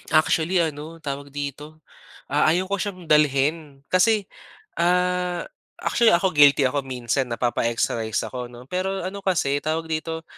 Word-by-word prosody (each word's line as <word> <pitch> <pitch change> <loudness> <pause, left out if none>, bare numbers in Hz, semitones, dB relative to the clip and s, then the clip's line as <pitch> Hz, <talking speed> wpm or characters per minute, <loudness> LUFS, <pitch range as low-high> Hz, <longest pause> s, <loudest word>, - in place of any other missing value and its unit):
Actually 165 +3 +3
ano 155 +1 -5
tawag 140 0 -5
dito, 145 +2 -6 0.5
ah, - - +3
ayaw 175 +4 +3
ko 200 - 0
siyang 185 -3 -4
dalhin 145 0 +2
kasi 210 +3 +3 0.6
ah, 180 0 +1 0.4
actually 235 -5 +4
ako 185 +2 +1
guilty 145 -2 +6
ako 135 +2 +1
minsan 125 0 -2
napapa-extra 115 -1 -1
rice 110 -1 -2
ako, 125 -1 -5
'no. 120 0 -12
Pero 190 +1 -2
ano 190 +2 -5
kasi 145 -7 0
tawag 160 +2 -3
dito, 160 +1 -3
155 Hz, 145 wpm, -23 LUFS, 140-180 Hz, 0.6 s, guilty